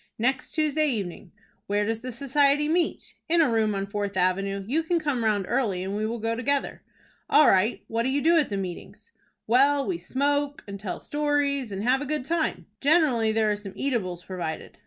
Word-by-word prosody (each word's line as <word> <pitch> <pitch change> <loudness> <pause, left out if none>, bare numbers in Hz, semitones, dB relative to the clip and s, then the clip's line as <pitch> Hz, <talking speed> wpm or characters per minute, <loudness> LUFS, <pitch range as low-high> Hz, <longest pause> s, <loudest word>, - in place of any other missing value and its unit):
"Next 255 +3 -1
Tuesday 310 -1 +1
evening." 195 -6 -4 0.4
"Where 205 +1 +1
does 225 +1 -2
the 255 +2 -6
society 280 +3 +2
meet?" 335 +1 -1 0.2
"In 340 +1 +3
a 320 - +5
room 220 -2 +1
on 195 0 -2
Fourth 200 -1 -3
Avenue. 195 +2 0
You 300 +7 +1
can 340 +2 0
come 290 -7 -1
round 210 -3 +1
early, 215 -8 0
and 195 +2 -3
we 215 +1 -1
will 230 +2 -3
go 225 0 -1
together." 275 +4 -1 0.5
"All 300 0 +6
right. 195 +5 +3
What 225 +1 -1
do 245 - 0
you 275 +2 +1
do 330 +4 +4
at 310 -4 +3
the 200 - -2
meetings?" 185 -3 -7 0.3
"Well, 275 +4 +4
we 355 -3 -2
smoke, 285 +1 -1
and 200 0 -7
tell 195 -2 -5
stories, 290 -4 -1
and 195 +1 -4
have 255 +3 +2
a 290 - -4
good 300 -3 -2
time. 330 0 -1
Generally 275 -8 +3
there 220 -1 +2
are - - +1
some 205 -2 -9
eatables 185 -10 -2
provided. 175 -4 -6
240 Hz, 200 wpm, -26 LUFS, 205-290 Hz, 0.5 s, All